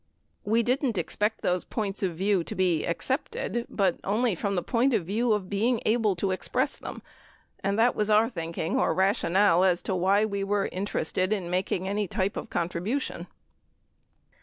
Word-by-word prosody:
We 225 +3 +2
didn't 250 -2 0
expect 210 +5 -1
those 180 0 +1
points 205 -3 -3
of 185 -4 -1
view 195 -1 +2
to - - -6
be 175 -4 +1
accepted, 240 - -2
but 190 -4 +1
only 220 +3 +1
from 200 +3 -2
the 175 - -1
point 245 +1 +2
of 190 -7 0
view 225 +6 0
of 205 -3 -2
being 220 +5 +1
able 215 -3 +2
to 190 +2 -1
express 185 - -1
them - - -8 0.6
and 200 +1 0
that 235 +2 +3
was 210 0 0
our 215 +1 +5
thinking 165 -6 -3
or 165 - +1
rationale 190 -1 +3
as 180 -2 +2
to - - -2
why 195 +4 +3
we 200 -2 -2
were 200 0 0
inter 195 +3 -2
ested 185 +4 -1
in 185 -5 -1
making 185 0 -1
any 205 +1 -1
type 195 +1 -1
of - - -5
contribution. 180 +11 -2
200 Hz, 180 wpm, -27 LUFS, 185-220 Hz, 0.6 s, our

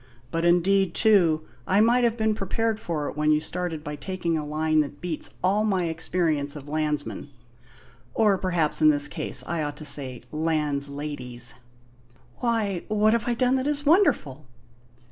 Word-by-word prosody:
"But, 165 +1 -1
indeed, 180 +1 +2
too, 175 -8 +4 0.2
I 190 - +3
might 240 +3 +4
have 235 -1 +1
been 220 -1 +1
prepared 220 +2 -2
for 155 -8 -3
it - - -6
when 150 0 0
you 150 - +3
started 165 -1 -4
by 150 0 -5
taking 170 +3 -3
a 155 - -2
line 155 +1 0
that 145 -1 -6
beats 170 -2 -3
all 200 +3 +2
my 190 -5 0
experience 160 -3 -1
of 145 -1 -9
landsmen; 150 -1 -3 0.9
or 210 -4 +3
perhaps 175 -6 0
in 155 - +7
this 145 -1 +6
case 155 +1 +1
I 170 -2 -2
ought 145 -1 -4
to 155 - -8
say 135 -4 0
lands_ladies_." 145 -5 -2 0.9
"Why, 220 -7 -1
what 215 +1 +2
have 235 0 -1
I 240 - +1
done 255 +2 +2
that 260 +2 -2
is 290 0 -1
wonderful?" 155 - +2
165 Hz, 165 wpm, -25 LUFS, 150-210 Hz, 0.9 s, in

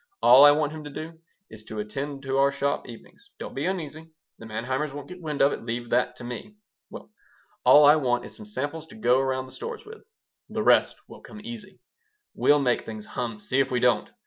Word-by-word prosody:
All 130 +3 +9
I - - +10
want 150 0 +2
him 155 -1 -8
to - - -6
do 160 +3 -8 0.3
is 110 -1 -11
to 110 - -8
attend 135 +7 -5
to 135 0 -1
our 140 0 +4
shop 140 -1 -2
evenings. 120 - -14
Don't - - -8
be - - -2
uneasy: 160 -3 -5 0.3
the 115 - -10
Manheimers 130 +7 -3
won't 145 0 -8
get 180 0 -11
wind 150 -4 -1
of 140 - +4
it. - - -6
Leave 120 +1 -5
that 125 0 +1
to 125 - -11
me. 125 +12 -8 0.3
Well, - - -11 0.5
all 150 0 +8
I 150 +2 +7
want 120 -4 0
is - - -11
some 215 - -11
samples 160 -4 -5
to 210 - -14
go 130 - +3
around 130 -1 -1
the 130 - -14
stores 465 -1 -7
with. 435 +1 -12 0.5
The - - -2
rest - - +4
will - - -13
come 210 - -12
easy. 210 -5 -9 0.5
We'll 145 - +4
make 125 -4 +1
things 110 -1 -8
hum. 115 -3 -5
See 130 +5 -1
if 135 -1 +2
we 125 -2 0
don't. - - +2
140 Hz, 225 wpm, -26 LUFS, 125-160 Hz, 0.5 s, I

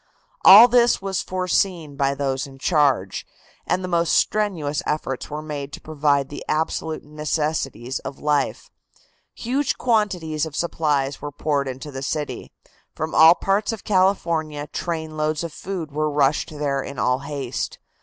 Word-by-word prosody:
All 210 +5 +11
this 240 -1 +4
was 195 -1 -2
foreseen 180 -4 -1
by 140 0 +1
those 135 -1 -2
in 135 -1 -13
charge, 135 - +1 0.4
and 185 - 0
the - - -3
most 170 -2 +1
strenuous 175 -9 +1
efforts 135 -4 -3
were 150 +1 -5
made 145 -2 -5
to - - -6
provide 145 -3 0
the 145 - -7
absolute 160 0 -1
necessities 150 -4 -2
of 140 - -7
life. 145 -2 -1 0.6
Huge 265 +4 -1
quantities 180 -10 0
of 150 - -10
supplies 145 -5 -1
were 145 0 -5
poured 145 -1 -1
into 130 +3 -6
the 135 -1 -6
city. 150 +2 -4 0.4
From 155 0 -4
all 160 +2 +8
parts 200 +5 0
of 225 -3 -7
California 170 -6 +1
trainloads 155 -2 -2
of 165 -2 -5
food 180 -6 -5
were 155 +1 0
rushed 145 +1 +1
there 145 -3 -2
in 140 0 -8
all 125 +1 +1
haste. 140 -3 -4
155 Hz, 150 wpm, -22 LUFS, 140-175 Hz, 0.6 s, All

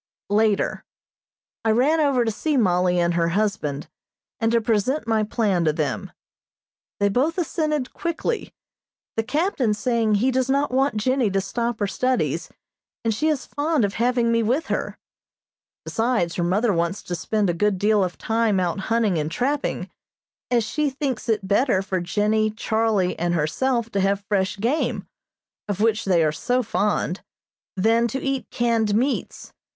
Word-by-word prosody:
Later: 210 -1 +1 0.8
I 225 - +1
ran 265 +9 +3
over 275 -5 +2
to 225 - +1
see 295 +7 -1
Mollie 180 -4 +2
and 170 0 +2
her 170 0 +1
husband, 170 -7 -1 0.5
and 225 -1 +1
to 235 - +4
present 230 +6 0
my 225 -1 +1
plan 210 -4 0
to 155 - +2
them. 150 -3 -2 0.9
They 205 - +3
both 270 - +1
assented 305 -5 -1
quickly, 340 +7 -3 0.6
the 225 - +1
Captain 260 - 0
saying 225 -1 +1
he 245 +6 +2
does 260 0 0
not 280 +1 +1
want 265 -2 +1
Jennie 255 +1 +1
to 195 0 +1
stop 235 +4 -2
her 205 - +1
studies, 255 +6 -1 0.6
and 225 - +2
she 300 +9 0
is 300 -4 0
fond 290 -4 0
of 200 - -3
having 240 0 +1
me 230 0 +2
with 255 +9 0
her. - - -2 0.9
Besides, 225 -7 0
her 175 - -1
mother 205 +5 +2
wants 170 +3 -1
to 180 - -5
spend 210 +4 0
a 175 - +1
good 200 +3 +1
deal 210 +1 +3
of 180 -1 -3
time 225 -3 +1
out 180 +1 -1
hunting 215 -3 +1
and 150 0 -2
trapping, 280 - -1 0.6
as 240 -2 +2
she 300 +7 -1
thinks 265 -4 -3
it 210 -3 0
better 205 -1 +2
for 190 -1 -2
Jennie, 210 +4 +1
Charlie 220 -3 0
and 175 +1 0
herself 230 - 0
to 200 - 0
have 195 +1 0
fresh 195 -1 0
game, 240 +10 -1 0.6
of 205 -2 -3
which 220 0 +1
they 175 -4 +3
are 155 - +2
so 250 +11 0
fond, 205 -4 -1 0.5
than 225 +4 +3
to 265 +4 -3
eat 270 -1 -2
canned 230 -3 +1
meats. 260 +5 -2
220 Hz, 165 wpm, -23 LUFS, 195-255 Hz, 0.9 s, to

